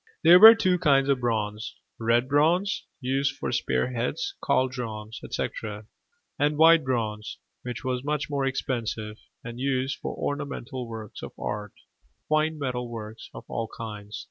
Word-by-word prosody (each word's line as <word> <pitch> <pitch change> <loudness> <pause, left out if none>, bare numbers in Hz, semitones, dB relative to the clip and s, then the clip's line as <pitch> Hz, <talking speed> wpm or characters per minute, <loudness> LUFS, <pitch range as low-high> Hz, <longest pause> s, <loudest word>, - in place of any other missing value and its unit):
There 175 +2 +9
were 220 +3 +12
two 185 -5 +2
kinds 140 -5 +3
of 135 -2 +3
bronze: 110 -3 -2 0.2
red 120 +2 +2
bronze, 165 +8 +2
used 135 +1 0
for - - -3
spear 125 +1 0
heads, 390 - -2
caldrons, 115 -4 -1
etc.; 105 0 -4 0.5
and 145 +1 +2
white 165 0 +7
bronze, 110 -5 -2 0.2
which 125 -1 -6
was 130 -1 -2
much 150 +1 -1
more 140 -2 -1
expensive, 115 -5 -3 0.2
and 115 +1 -7
used 135 0 -1
for - - -5
ornamental 140 -3 -4
works 110 -2 -8
of - - -8
art 105 -1 -4 0.5
fine 155 +1 +1
metal 125 -4 -3
work 110 -1 -7 0.2
of - - -9
all 115 -1 -3
kinds. 105 -2 -7
125 Hz, 145 wpm, -26 LUFS, 115-145 Hz, 0.5 s, were